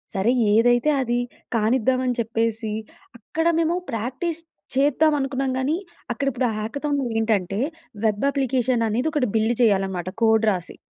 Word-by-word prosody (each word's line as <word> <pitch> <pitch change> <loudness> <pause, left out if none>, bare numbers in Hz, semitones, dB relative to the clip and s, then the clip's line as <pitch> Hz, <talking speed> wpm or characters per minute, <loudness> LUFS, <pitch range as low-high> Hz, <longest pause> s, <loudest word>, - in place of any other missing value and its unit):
సరే 200 +5 +2 0.2
ఏదైతే 240 +5 +4
అది 240 -1 0 0.4
కానిద్దాం 250 +3 +2
అని 250 -1 0
చెప్పేసి 225 -1 -1 0.5
అక్కడ 325 +9 -3
మేము 330 +1 +1 0.2
ప్రాక్టీస్ 260 +9 -3 0.3
చేద్దాం 295 +3 +3
అనుకున్నాం 270 -1 -1
గానీ, 270 +4 0 0.4
అక్కడ 275 +4 -2
ఇప్పుడు 250 +1 -1
ఆ - - -1
హాకథాన్‌లో 280 +5 -2
ఏంటంటే, 210 -3 0 0.5
వెబ్ 210 +2 +1
అప్లికేషన్ 255 -3 +1
అనేది 250 +9 0
ఒకటి 285 -5 +1
బిల్డ్ 220 +2 +2
చేయాలి 200 -4 +4
అన్నమాట 180 -1 -4
కోడ్ 220 0 +4
రాసి. 180 -2 -4
240 Hz, 145 wpm, -23 LUFS, 220-270 Hz, 0.5 s, ఏదైతే